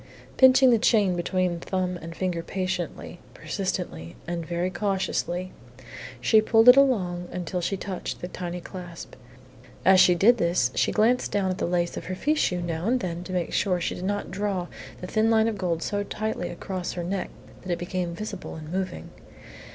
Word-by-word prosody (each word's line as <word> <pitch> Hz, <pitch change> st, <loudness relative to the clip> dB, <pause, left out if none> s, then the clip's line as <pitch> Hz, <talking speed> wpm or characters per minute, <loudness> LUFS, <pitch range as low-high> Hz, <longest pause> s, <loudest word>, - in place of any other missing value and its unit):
Pinching 260 Hz, 0 st, +7 dB
the 230 Hz, -, +4 dB
chain 205 Hz, -5 st, +3 dB
between 175 Hz, 0 st, 0 dB
thumb 185 Hz, 0 st, -2 dB
and 165 Hz, +1 st, -8 dB
finger 180 Hz, -2 st, -2 dB
patiently, 180 Hz, -1 st, -4 dB, 0.2 s
persistently, 165 Hz, -, -4 dB
and 170 Hz, 0 st, -3 dB
very 175 Hz, +2 st, -2 dB
cautiously, 185 Hz, -1 st, -2 dB, 0.7 s
she 215 Hz, -, +5 dB
pulled 225 Hz, +2 st, +4 dB
it 250 Hz, -, +11 dB
along 185 Hz, -11 st, +2 dB
until 180 Hz, 0 st, -3 dB
she 195 Hz, +3 st, -1 dB
touched 185 Hz, 0 st, -5 dB
the 180 Hz, -, -5 dB
tiny 180 Hz, -1 st, -5 dB
clasp. 175 Hz, -1 st, -9 dB, 0.7 s
As 190 Hz, +1 st, +7 dB
she 180 Hz, -1 st, +6 dB
did 235 Hz, +7 st, +5 dB
this 170 Hz, -8 st, +2 dB
she -, -, +1 dB
glanced 235 Hz, +4 st, +2 dB
down 195 Hz, -2 st, +1 dB
at 185 Hz, -, -4 dB
the -, -, 0 dB
lace 175 Hz, -1 st, 0 dB
of -, -, -6 dB
her 185 Hz, -, -4 dB
fichu 190 Hz, -, 0 dB
now 170 Hz, +2 st, -3 dB
and 255 Hz, +2 st, +2 dB
then 175 Hz, -4 st, -4 dB
to 185 Hz, -, -7 dB
make 180 Hz, -2 st, -2 dB
sure 190 Hz, -3 st, +2 dB
that 175 Hz, -, -3 dB
she -, -, -1 dB
did 180 Hz, -, -7 dB
not 205 Hz, +2 st, -2 dB
draw 195 Hz, -1 st, -2 dB, 0.4 s
the -, -, -5 dB
thin 215 Hz, +4 st, +1 dB
line 220 Hz, 0 st, +4 dB
of 225 Hz, -, -1 dB
gold 170 Hz, -3 st, -1 dB
so 205 Hz, 0 st, -1 dB
tightly 210 Hz, -2 st, -3 dB
across 180 Hz, +1 st, -5 dB
her 175 Hz, -, -4 dB
neck 190 Hz, +2 st, -3 dB, 0.3 s
that 185 Hz, -, -5 dB
it 175 Hz, -, 0 dB
became 175 Hz, -1 st, -3 dB
visible 205 Hz, 0 st, -6 dB
in 155 Hz, 0 st, -9 dB
moving. 185 Hz, 0 st, -4 dB
185 Hz, 190 wpm, -26 LUFS, 175-205 Hz, 0.7 s, it